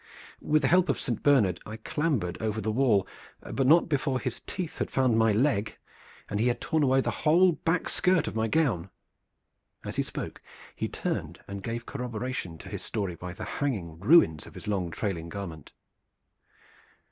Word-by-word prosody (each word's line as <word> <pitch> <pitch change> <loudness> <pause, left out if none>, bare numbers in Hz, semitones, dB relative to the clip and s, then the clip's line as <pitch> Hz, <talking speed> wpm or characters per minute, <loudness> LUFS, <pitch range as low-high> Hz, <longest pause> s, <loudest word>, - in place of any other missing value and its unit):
With 155 0 +2
the - - +4
help 180 +1 +4
of 140 - +1
Saint 120 -4 -2
Bernard 115 -12 +4
I 110 +1 -7
clambered 120 - -1
over 110 -1 -1
the 110 +1 -1
wall, 110 -5 +3 0.5
but 135 -1 +1
not 165 +4 +6
before 140 -4 0
his 125 -2 -4
teeth 180 -4 -5
had - - -1
found 130 -3 +2
my 110 0 +4
leg, 110 -1 +1 0.5
and 105 - -2
he 115 - +3
had 120 - +1
torn 160 - 0
away 135 -1 +4
the - - -1
whole 175 +4 +5
back 165 +1 -1
skirt 180 -4 +2
of - - -3
my 110 0 +1
gown." 115 - +1 1.0
As - - -5
he - - +3
spoke - - -6 0.3
he - - -2
turned - - -3
and 100 0 -6
gave 120 +3 -4
corroboration 125 -8 -4
to 95 - -11
his 100 -1 -5
story 100 -5 -3
by 90 +1 -7
the 105 - -7
hanging 95 - -3
ruins 100 - +5
of - - -14
his - - -8
long 95 -4 0
trailing 85 -2 -3
garment. 85 -6 -7
115 Hz, 180 wpm, -28 LUFS, 100-145 Hz, 1.0 s, not